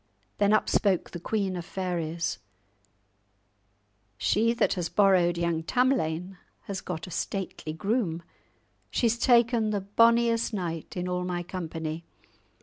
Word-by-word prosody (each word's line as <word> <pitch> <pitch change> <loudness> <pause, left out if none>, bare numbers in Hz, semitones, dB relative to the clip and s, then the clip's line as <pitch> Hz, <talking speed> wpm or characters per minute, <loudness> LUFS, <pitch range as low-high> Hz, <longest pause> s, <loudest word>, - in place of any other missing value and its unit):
Then 205 0 +4
up 215 - +3
spoke 195 -4 +1
the 175 - -6
Queen 195 0 -1
of 175 - -4
Fairies, 170 -2 -3 1.8
"She 225 +3 +2
that 235 - +2
has 175 -4 -2
borrowed 185 -4 +4
young 170 -1 0
Tamlane 185 -5 0 0.2
has 195 -1 -5
got 175 -3 -5
a 180 - -10
stately 185 -2 -4
groom! 175 -1 -1 0.7
She's 235 -1 +1
taken 235 -3 +4
the 205 -2 -1
bonniest 230 +3 +3
knight 170 -3 -4
in 180 0 -2
all 180 0 -1
my 175 -1 -2
company! 165 -2 -5
185 Hz, 130 wpm, -27 LUFS, 170-220 Hz, 1.8 s, Then